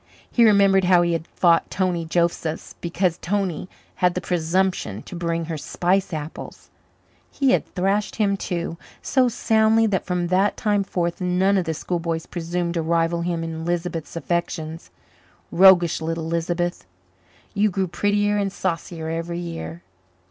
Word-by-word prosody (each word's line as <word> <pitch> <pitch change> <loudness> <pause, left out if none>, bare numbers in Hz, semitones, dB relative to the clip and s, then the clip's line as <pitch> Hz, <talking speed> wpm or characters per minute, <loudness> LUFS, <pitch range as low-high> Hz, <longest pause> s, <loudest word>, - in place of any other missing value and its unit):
He 235 - +4
remembered 200 -3 +5
how 180 -1 +5
he 170 0 +1
had 165 0 -3
fought 170 -2 +2
Tony 180 -3 -1
Josephs 165 -1 -1
because 170 0 0
Tony 185 -2 -2 0.3
had 180 -1 +2
the - - 0
presumption 175 - -1
to - - -9
bring 170 -1 -2
her 160 -2 -4
spice 185 +6 0
apples: 155 -1 -7 0.6
he 275 -2 +1
had - - +1
thrashed 195 +3 0
him 200 -2 +1
too, 170 -3 -4 0.3
so 255 -2 +3
soundly 220 0 +3
that 200 -4 -1
from 180 -1 -1
that 190 +3 +2
time 205 -2 +1
forth 175 -2 -2
none 185 +2 +2
of 185 -3 +1
the 160 -1 -2
schoolboys 165 -1 -3
presumed 175 0 -3
to 170 - -1
rival 165 +1 +1
him 170 -1 -2
in 160 0 -5
Lisbeth's 170 -1 -3
affections 165 -1 -3 0.6
roguish 175 -3 +6
little 165 0 -3
Lisbeth! 170 +1 -2 0.7
who 210 +1 +2
grew 190 0 -1
prettier 205 +3 +1
and 200 -1 0
saucier 165 -3 -3
every 165 +1 -3
year. 85 - -6
175 Hz, 150 wpm, -23 LUFS, 165-190 Hz, 0.7 s, roguish